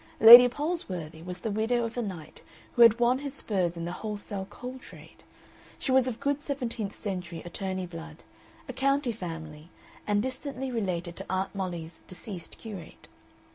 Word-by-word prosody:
Lady 240 +3 +12
Palsworthy 235 - -4
was 180 0 -6
the 220 - -2
widow 225 +3 +1
of 230 - -6
a 245 - -1
knight 185 -8 -7 0.3
who 240 - +3
had 230 0 +8
won 245 +2 +3
his 280 -1 -6
spurs 180 -8 -1
in 170 - -4
the 175 - -3
wholesale 205 -1 -5
coal 255 +1 -8
trade, - - -15 0.5
she 265 - -2
was 260 -1 +4
of 235 -3 -3
good 285 0 -1
seventeenth 245 -8 -4
century 180 -5 -5
attorney 185 +1 -3
blood, 165 -2 -10 0.4
a - - -5
county 275 -1 +1
family, 160 -6 -8 0.4
and 205 0 +2
distantly 260 0 -4
related 180 -7 -2
to - - -6
Aunt 190 +1 -1
Mollie's 175 -4 -5
deceased 185 -1 -8
curate. 200 -7 -10
205 Hz, 165 wpm, -28 LUFS, 175-245 Hz, 0.5 s, Lady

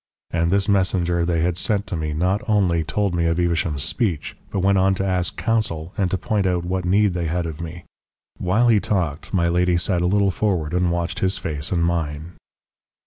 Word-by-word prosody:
And 85 0 +1
this 100 +2 +2
messenger 90 -4 +1
they 85 -2 +1
had 85 +1 0
sent 100 +2 0
to 95 - -4
me 80 -1 -2
not 90 +6 0
only 90 -6 +2
told 90 +5 -1
me 85 -1 +1
of 85 +1 0
Evesham's 85 -4 0
speech, 85 -2 -2
but 100 - -2
went 95 0 +3
on 95 +1 +3
to 95 - -2
ask 90 -5 -1
counsel 95 -7 -1
and 95 -3 0
to 95 - 0
point 105 -2 0
out 90 -1 0
what 90 0 -2
need 100 +1 +3
they 85 -2 -2
had 85 +2 -1
of 80 -1 -6
me. 85 0 -7 0.6
While 110 +7 +2
he 110 -3 +5
talked, 85 -8 -2
my 85 -3 +2
lady 90 +1 +2
sat 85 0 0
a 90 - +2
little 100 +1 +2
forward 90 -6 -1
and 90 0 +2
watched 85 -1 -2
his 95 0 0
face 80 -6 -4
and 85 -2 +1
mine. 80 -1 -2
90 Hz, 210 wpm, -22 LUFS, 85-95 Hz, 0.6 s, he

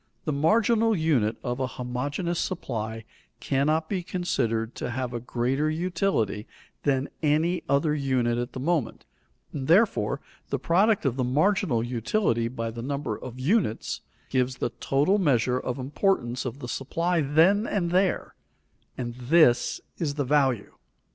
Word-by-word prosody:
The 155 - 0
marginal 220 +8 +3
unit 130 - +1
of 120 +1 -2
a 130 - 0
homogeneous 145 +8 -2
supply 110 - -3 0.4
cannot 155 +4 +1
be 190 -1 -2
considered 120 -11 -1
to - - -3
have 125 0 -3
a 120 - -2
greater 125 +5 0
utility 165 - -1 0.3
than 135 -1 +1
any 160 +3 +2
other 145 +2 +2
unit 130 -5 0
at 120 0 -4
the - - -5
moment, 145 -4 -1 0.5
and 135 -2 -4
therefore 200 +7 +3 0.3
the - - 0
product 195 +3 +2
of 130 -1 0
the 130 - +1
marginal 150 - +2
utility 120 - 0
by 115 -1 -4
the 115 +1 -7
number 140 -3 -3
of 125 +3 -9
units, 160 - 0 0.3
gives 130 -1 +1
the 120 - -2
total 150 +10 +2
measure 125 - +2
of 125 0 -3
importance 130 -3 0
of 125 +1 -4
the 125 - -5
supply 165 +7 -1
then 165 +10 +4
and 175 -4 -1
there, 185 +1 +1 0.6
and 120 -1 -4
this 125 +1 +3 0.2
is 145 -4 -1
the 145 -2 -1
value. 130 -5 +1
140 Hz, 150 wpm, -26 LUFS, 120-170 Hz, 0.6 s, then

